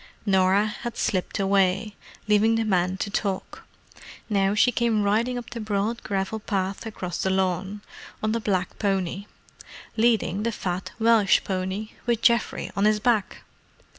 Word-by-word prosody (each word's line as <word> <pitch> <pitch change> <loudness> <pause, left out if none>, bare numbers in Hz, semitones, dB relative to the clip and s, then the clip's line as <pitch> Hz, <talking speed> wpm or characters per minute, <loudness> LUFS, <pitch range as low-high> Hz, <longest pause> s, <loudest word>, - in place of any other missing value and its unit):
Norah 190 0 +3
had 235 +2 -5
slipped 185 +1 -1
away, 195 +1 +1 0.3
leaving 215 +2 +4
the 225 0 0
men 185 -2 +1
to 200 +2 -3
talk. 195 -2 -3 0.7
Now 200 0 +2
she 245 +4 +4
came 230 -3 +1
riding 225 +5 +1
up 240 - -7
the 235 - -5
broad 215 +2 -1
gravel 195 +2 -2
path 195 0 -3
across 180 -5 -5
the 190 - 0
lawn, 190 +2 -1 0.4
on 215 - +1
the 230 - 0
black 185 -4 -2
pony: 195 -1 -1 0.7
leading 220 -3 +2
the 230 +2 0
fat 185 -3 -4
Welsh 220 -6 +4
pony, 190 +3 -3 0.2
with 235 -1 0
Geoffrey 235 0 +2
on 200 - +2
his 215 0 +3
back. 220 -2 0
205 Hz, 150 wpm, -25 LUFS, 190-220 Hz, 0.7 s, leaving